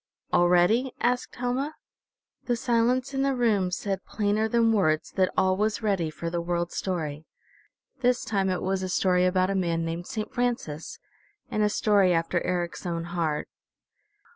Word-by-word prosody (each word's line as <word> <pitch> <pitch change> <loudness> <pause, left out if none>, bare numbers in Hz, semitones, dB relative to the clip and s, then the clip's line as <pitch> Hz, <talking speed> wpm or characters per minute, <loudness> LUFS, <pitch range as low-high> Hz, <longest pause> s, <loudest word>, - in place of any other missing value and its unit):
"All 175 0 +4
ready?" 220 +9 +3
asked 245 +1 0
Helma. 255 +5 -2 0.7
The 240 - +1
silence 245 +3 +1
in 270 - 0
the 275 -1 +1
room 215 -7 +2
said 195 +1 -3
plainer 210 +1 0
than 230 0 +3
words 155 -7 +1
that 185 -1 +1
all 185 0 +3
was 215 +3 -1
ready 195 -6 +1
for 165 +2 -5
the 170 0 -1
World 175 0 -2
Story. 160 -5 -3 0.7
This 250 -1 +1
time 195 -2 0
it 185 -1 -1
was 190 0 0
a 185 - -3
story 180 0 +2
about 185 +1 +2
a - - 0
man 170 -3 0
named 165 +2 -4
Saint 215 -1 -5
Francis, 235 - -2 0.5
and 215 -3 0
a 210 - +3
story 200 -3 +3
after 165 +1 0
Eric's 175 -1 -2
own 170 -1 -2
heart. 160 -4 -1
190 Hz, 165 wpm, -26 LUFS, 175-230 Hz, 0.7 s, All